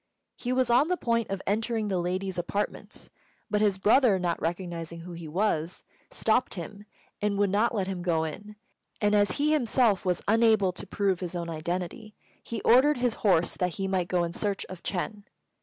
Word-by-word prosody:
He 245 Hz, -, -4 dB
was 255 Hz, -1 st, +2 dB
on 250 Hz, +6 st, +5 dB
the 360 Hz, +1 st, 0 dB
point 230 Hz, -5 st, 0 dB
of 195 Hz, -1 st, -4 dB
entering 220 Hz, +1 st, 0 dB
the 190 Hz, -3 st, 0 dB
ladies' 185 Hz, +1 st, -2 dB
apartments; 200 Hz, +4 st, -4 dB, 0.4 s
but 210 Hz, 0 st, +2 dB
his 205 Hz, -3 st, +2 dB
brother, 215 Hz, +1 st, +4 dB
not 175 Hz, -2 st, -2 dB
recognising 170 Hz, -1 st, -4 dB
who 180 Hz, +2 st, -9 dB
he 170 Hz, -1 st, -8 dB
was, 170 Hz, -1 st, -1 dB, 0.3 s
stopped 225 Hz, +2 st, +1 dB
him, 200 Hz, +4 st, -8 dB, 0.4 s
and 205 Hz, -1 st, 0 dB
would 200 Hz, -1 st, +2 dB
not 225 Hz, +4 st, +2 dB
let 195 Hz, -3 st, 0 dB
him 185 Hz, -2 st, -4 dB
go 165 Hz, -3 st, +1 dB
in; 205 Hz, +7 st, -7 dB, 0.4 s
and 210 Hz, -1 st, +2 dB
as 205 Hz, -2 st, +3 dB
he 300 Hz, +1 st, +1 dB
himself 240 Hz, -7 st, +2 dB
was 180 Hz, -2 st, -1 dB
unable 220 Hz, -3 st, +4 dB
to 185 Hz, -, -9 dB
prove 195 Hz, -1 st, 0 dB
his 180 Hz, -1 st, -5 dB
own 170 Hz, -1 st, -3 dB
identity, 180 Hz, +6 st, -4 dB, 0.3 s
he 230 Hz, -, -5 dB
ordered 265 Hz, +5 st, +5 dB
his 245 Hz, -2 st, +1 dB
horse 175 Hz, -5 st, +3 dB
that 180 Hz, -2 st, -1 dB
he 195 Hz, -, -2 dB
might 185 Hz, -2 st, 0 dB
go 180 Hz, -1 st, +1 dB
in 170 Hz, 0 st, -3 dB
search 200 Hz, 0 st, -2 dB
of 185 Hz, -2 st, -9 dB
Ch'êng. 205 Hz, +4 st, -3 dB
195 Hz, 190 wpm, -27 LUFS, 175-220 Hz, 0.4 s, on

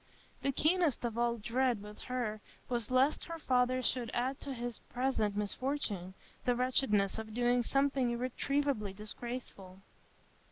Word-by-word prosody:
The 275 Hz, -, +1 dB
keenest 310 Hz, -2 st, +2 dB
of 230 Hz, -2 st, -2 dB
all 235 Hz, 0 st, +1 dB
dread 235 Hz, 0 st, +1 dB
with 210 Hz, 0 st, -10 dB
her 240 Hz, -4 st, -2 dB, 0.3 s
was 240 Hz, -3 st, -1 dB
lest 260 Hz, +4 st, +3 dB
her 335 Hz, -, -5 dB
father 255 Hz, -3 st, +2 dB
should 245 Hz, -1 st, 0 dB
add 255 Hz, +3 st, 0 dB
to 280 Hz, -, -5 dB
his 240 Hz, -2 st, -4 dB
present 235 Hz, -5 st, +1 dB
misfortune 210 Hz, -4 st, -1 dB, 0.3 s
the 245 Hz, -, +2 dB
wretchedness 230 Hz, -5 st, +2 dB
of 220 Hz, -1 st, -7 dB
doing 245 Hz, 0 st, +3 dB
something 275 Hz, 0 st, +2 dB
irretrievably 250 Hz, -2 st, 0 dB
disgraceful. 210 Hz, -3 st, -6 dB
245 Hz, 135 wpm, -34 LUFS, 215-265 Hz, 0.3 s, lest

